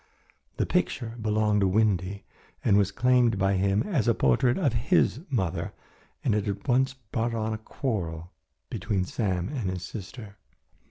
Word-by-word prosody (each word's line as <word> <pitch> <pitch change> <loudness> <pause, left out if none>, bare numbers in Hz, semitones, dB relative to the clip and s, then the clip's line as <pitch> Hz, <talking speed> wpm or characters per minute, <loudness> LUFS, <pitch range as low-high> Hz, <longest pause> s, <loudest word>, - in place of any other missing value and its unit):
The - - +1
picture 115 -2 -1
belonged 105 -1 +2
to 100 - +4
Windy 100 -1 +1 0.4
and 100 - +5
was 100 -1 +3
claimed 125 0 +3
by 95 +1 +2
him 100 +1 +2
as 145 - 0
a 115 - +4
portrait 95 - +3
of 145 -10 +1
his 115 +2 +2
mother, 95 - -1 0.5
and - - +2
it 105 0 0
had 100 +5 -4
once 130 +1 +2
brought 115 -1 -3
on 110 0 -1
a 110 - -4
quarrel 90 - -4 0.4
between 105 -3 -1
Sam 90 -3 -1
and 125 -10 -2
his 90 -1 -4
sister. 100 +1 -8
105 Hz, 160 wpm, -27 LUFS, 95-120 Hz, 0.5 s, and